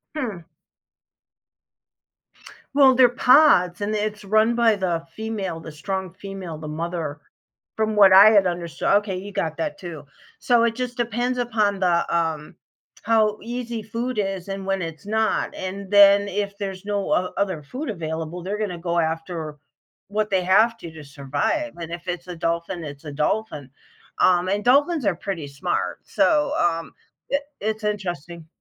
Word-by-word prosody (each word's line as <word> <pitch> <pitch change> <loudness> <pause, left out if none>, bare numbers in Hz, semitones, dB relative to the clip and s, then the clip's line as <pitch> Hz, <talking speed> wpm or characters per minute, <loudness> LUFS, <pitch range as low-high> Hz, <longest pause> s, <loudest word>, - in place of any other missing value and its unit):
Hmm. 210 - -4 2.3
Well, 270 -2 +6
they're 255 -1 +6
pods 245 - +5
and 215 +1 -1
it's 210 0 -3
run 215 +3 +3
by 230 -2 +4
the 175 -4 -2
female, 215 -6 -4
the 160 -1 -9
strong 190 +3 -4
female, 190 -4 -7
the 155 0 -8
mother. 160 -1 -4 0.6
From 220 -1 0
what 200 -2 +7
I 205 +3 +9
had 200 -3 +5
understood 175 -2 -3
okay, 205 -3 -3
you 200 +2 -7
got 165 -5 -2
that 195 +4 -3
too, 170 -6 -8 0.3
so, 240 -2 +3
it 230 -1 +1
just 250 0 -4
depends 240 +1 -1
upon 220 -5 0
the, 175 -2 +2
um 160 -3 -2 0.5
how 215 -1 +2
easy 235 -1 -5
food 235 +3 -4
is 195 -2 -3
and 195 0 -5
when 195 -1 -1
it's 165 +3 -7
not, 220 +1 0
and 190 +1 -6
then 200 0 +7
if 200 0 -3
there's 195 -2 -5
no 205 -1 -1
o 180 0 0
other 185 -6 -1
food 255 - -6
available, 165 -2 -4
they're 200 +3 -3
gonna 195 -5 -3
go 170 0 -1
after 160 -1 -3 0.5
what 215 +1 -1
they 185 -1 +2
have 215 +6 +4
to, 170 - -9
to 160 -1 -11
survive, 145 - -2
and 165 -1 -7
if 170 +1 -8
it's 175 0 -4
a 180 - -6
dolphin, 170 +1 -2
it's 145 0 -9
a 150 - -6
dolphin, 150 -1 -2 0.5
um, 180 0 +3
and 205 +2 0
dolphins 285 +2 +3
are 195 -4 +2
pretty 170 -4 -5
smart, 140 0 -3
so, 300 -3 +2
um, 165 -1 0 0.4
it 280 +1 0 0.2
it's 215 +1 -2
interesting. 175 -5 -4
195 Hz, 165 wpm, -23 LUFS, 170-220 Hz, 2.3 s, I